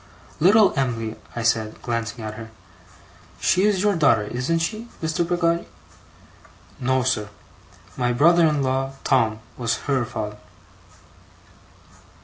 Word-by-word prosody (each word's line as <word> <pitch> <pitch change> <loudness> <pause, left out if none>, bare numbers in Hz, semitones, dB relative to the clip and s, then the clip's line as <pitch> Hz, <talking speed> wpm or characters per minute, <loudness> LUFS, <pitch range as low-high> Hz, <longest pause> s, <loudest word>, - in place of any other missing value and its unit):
'Little 200 +5 +5
Em'ly,' 115 -5 -1 0.2
I 120 - -3
said, 110 -2 0
glancing 115 -1 -3
at 110 0 -5
her. 110 0 -9 0.9
'She 185 - +2
is 205 -2 +2
your 205 -1 +3
daughter, 140 -10 +3
isn't 125 +10 -1
she, 215 +8 -3
Mr. 165 +1 -1
Peggotty?' 170 -1 +1 1.1
'No, 130 0 +1
sir. 105 -5 -1 0.7
My 125 -1 0
brother 165 +6 +5
in 150 -2 +1
law, 135 +1 -1
Tom, 110 -5 +2 0.2
was 120 -1 -1
her 135 -3 +1
father. 105 -2 -5
130 Hz, 125 wpm, -23 LUFS, 115-170 Hz, 1.1 s, Little